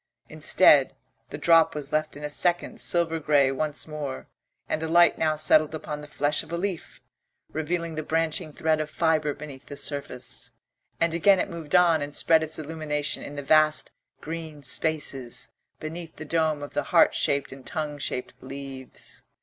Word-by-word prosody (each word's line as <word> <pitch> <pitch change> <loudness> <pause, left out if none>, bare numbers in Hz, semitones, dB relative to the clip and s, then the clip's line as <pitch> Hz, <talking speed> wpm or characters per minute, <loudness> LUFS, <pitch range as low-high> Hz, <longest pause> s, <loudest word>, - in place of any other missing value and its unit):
Instead, - - +4 0.3
the - - -6
drop 165 -2 +4
was 145 -2 -6
left 155 -1 -1
in 150 - -10
a - - -1
second 175 +4 0
silver 165 -2 +1
grey 145 -3 +3
once 150 +3 -2
more, 150 -4 -6 0.4
and 155 - -2
the 160 - -2
light 170 +1 +5
now 155 -1 +2
settled 155 0 +3
upon 150 -1 -6
the 150 - -10
flesh 150 0 0
of - - -13
a 170 - -1
leaf, 185 -1 -4 0.5
revealing 165 +1 -2
the 155 - -3
branching 160 +1 -1
thread 155 +1 0
of 155 - -4
fibre 155 -2 +1
beneath 145 -2 -10
the 145 - -8
surface, 140 -3 -2 0.5
and 165 -1 +2
again 190 +4 +5
it 195 - -2
moved 165 0 -3
on 170 -3 +5
and 145 0 -4
spread 160 -1 +5
its 160 0 -2
illumination 155 -1 -2
in 145 - -8
the 145 - -5
vast 155 +1 +3 0.3
green 160 -2 -7
spaces 135 -4 -2 0.3
beneath 160 +1 -7
the 155 - -8
dome 155 -2 0
of 145 - -8
the - - -1
heart - - +4
shaped 140 0 0
and 135 -1 -11
tongue 150 -2 -4
shaped 125 -2 -3
leaves. 135 0 -8
155 Hz, 175 wpm, -26 LUFS, 145-160 Hz, 0.5 s, light